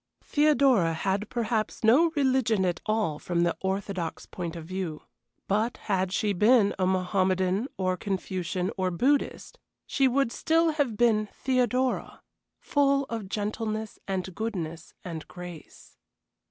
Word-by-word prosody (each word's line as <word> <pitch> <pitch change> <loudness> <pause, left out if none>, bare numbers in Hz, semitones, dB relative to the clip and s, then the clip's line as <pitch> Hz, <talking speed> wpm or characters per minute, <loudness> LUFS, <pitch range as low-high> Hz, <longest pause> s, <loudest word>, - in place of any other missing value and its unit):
Theodora 275 - +3
had 195 +5 -1
perhaps 225 -2 -2
no 270 +10 +6
religion 255 -8 +2
at 175 -2 -1
all 215 -9 0
from 175 -1 0
the 170 -1 +1
orthodox 190 -3 -3
point 175 -2 -6
of 165 -2 -7
view; 180 -3 -4 0.4
but 215 +4 0
had 190 -2 -1
she 205 +1 +1
been 210 +1 +4
a 185 - +2
Mohommedan 185 +3 +1
or 185 -1 +1
a - - -5
Confucian 185 -1 -2
or 185 -1 0
a - - -1
Buddhist, 270 +11 0 0.3
she 270 -1 +2
would 260 -1 +1
still 325 +4 +2
have 285 -8 -1
been 215 -3 +3
Theodora, 255 0 0 0.4
full 280 -1 +2
of 220 -4 -4
gentleness 215 +1 -3
and 190 -1 -3
goodness 170 -7 -5
and 165 -3 -6
grace. 180 -3 -11
205 Hz, 140 wpm, -27 LUFS, 185-240 Hz, 0.4 s, no